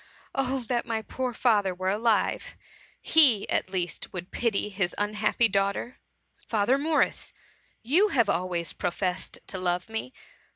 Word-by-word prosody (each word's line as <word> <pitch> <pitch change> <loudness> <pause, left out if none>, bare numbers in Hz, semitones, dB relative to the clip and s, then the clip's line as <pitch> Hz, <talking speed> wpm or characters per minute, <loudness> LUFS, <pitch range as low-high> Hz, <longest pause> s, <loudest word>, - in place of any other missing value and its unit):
Oh 270 0 0
that 240 0 -2
my 225 -1 -2
poor 255 +3 -3
father 210 -6 +2
were 185 +1 -1
alive! 225 - 0 0.2
— - - -28
he, 270 -11 +6
at - - 0
least, 180 -2 -3
would 180 0 -7
pity 220 -3 0
his 190 -3 -1
unhappy 210 +2 +1
daughter. 200 +4 -1 0.5
Father 230 +5 +2
Morris, 310 +1 0 0.5
you 330 - +4
have 240 - +2
always 175 -2 -1
professed 180 +1 -3
to 190 - -6
love 180 +2 -1
me. 225 +3 -4
210 Hz, 140 wpm, -27 LUFS, 185-245 Hz, 0.5 s, he